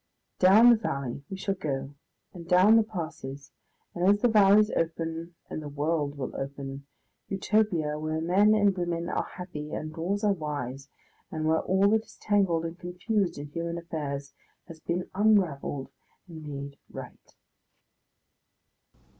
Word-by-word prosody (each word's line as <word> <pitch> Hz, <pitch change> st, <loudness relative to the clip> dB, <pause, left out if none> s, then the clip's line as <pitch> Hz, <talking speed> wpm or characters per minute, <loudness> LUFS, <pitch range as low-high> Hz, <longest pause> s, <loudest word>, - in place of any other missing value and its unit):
Down 210 Hz, +6 st, +8 dB
the 225 Hz, -2 st, +3 dB
mountain 140 Hz, -, -3 dB
we 190 Hz, -, -5 dB
shall 195 Hz, +1 st, -1 dB
go 140 Hz, -6 st, -4 dB, 0.4 s
and 170 Hz, -3 st, -10 dB
down 185 Hz, +5 st, +6 dB
the 225 Hz, -, +7 dB
passes, 155 Hz, -9 st, -6 dB, 0.4 s
and 175 Hz, -, -3 dB
as 205 Hz, 0 st, +4 dB
the -, -, +7 dB
valleys 210 Hz, 0 st, +6 dB
open 165 Hz, +1 st, -2 dB
the 155 Hz, -1 st, -5 dB
world 145 Hz, 0 st, -1 dB
will 130 Hz, -, -5 dB
open, 140 Hz, 0 st, -6 dB, 0.4 s
Utopia, 190 Hz, -7 st, +1 dB
where 155 Hz, +1 st, -2 dB
men 195 Hz, +6 st, +4 dB
and 205 Hz, -2 st, +3 dB
women 175 Hz, -1 st, -2 dB
are -, -, -2 dB
happy 155 Hz, -5 st, -7 dB
and 155 Hz, 0 st, -5 dB
laws 190 Hz, +6 st, -2 dB
are 205 Hz, -1 st, +4 dB
wise, 145 Hz, -5 st, -5 dB, 0.4 s
and 155 Hz, -1 st, -3 dB
where 160 Hz, +1 st, +3 dB
all 190 Hz, +2 st, +3 dB
that 220 Hz, +1 st, +2 dB
is -, -, -18 dB
tangled 190 Hz, -6 st, +2 dB
and 165 Hz, +2 st, -6 dB
confused 180 Hz, +2 st, -1 dB
in 145 Hz, 0 st, -7 dB
human 170 Hz, +2 st, -3 dB
affairs 145 Hz, -4 st, -5 dB, 0.3 s
has 165 Hz, -2 st, -11 dB
been 175 Hz, +3 st, -2 dB
unravelled 180 Hz, -10 st, +1 dB, 0.4 s
and 160 Hz, -3 st, -9 dB
made 140 Hz, -1 st, -7 dB
right. -, -, -11 dB
170 Hz, 145 wpm, -28 LUFS, 145-195 Hz, 0.4 s, Down